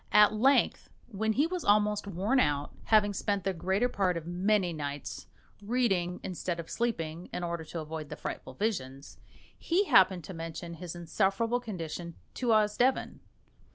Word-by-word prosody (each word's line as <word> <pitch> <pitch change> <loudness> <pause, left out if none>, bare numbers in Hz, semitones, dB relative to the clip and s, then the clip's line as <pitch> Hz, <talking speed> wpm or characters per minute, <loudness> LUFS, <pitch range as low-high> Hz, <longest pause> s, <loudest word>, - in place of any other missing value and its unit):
At 210 0 +7
length, 265 +6 +3 0.2
when 220 +2 0
he 280 +7 +3
was 350 -1 -3
almost 210 0 +3
worn 200 +8 +1
out, 145 - +1
having 210 -2 +4
spent 200 0 -1
the 195 - 0
greater 190 +7 +1
part 190 -7 0
of 165 - -6
many 180 +1 +1
nights 145 -2 -5 0.3
reading 200 -6 0
instead 175 -1 -3
of 165 - -7
sleeping, 175 -8 -2
in 180 - -4
order 170 -1 -3
to 165 +1 -5
avoid 155 -1 -6
the - - -5
frightful 130 - -6
visions, 140 -10 -3 0.4
he 355 +4 +1
happened 190 - +5
to 190 - -8
mention 165 0 -6
his 170 +1 -7
insufferable 195 +7 0
condition 170 -6 -6 0.2
to 250 - -3
Osdeven. 220 +4 +2
190 Hz, 155 wpm, -30 LUFS, 170-215 Hz, 0.4 s, At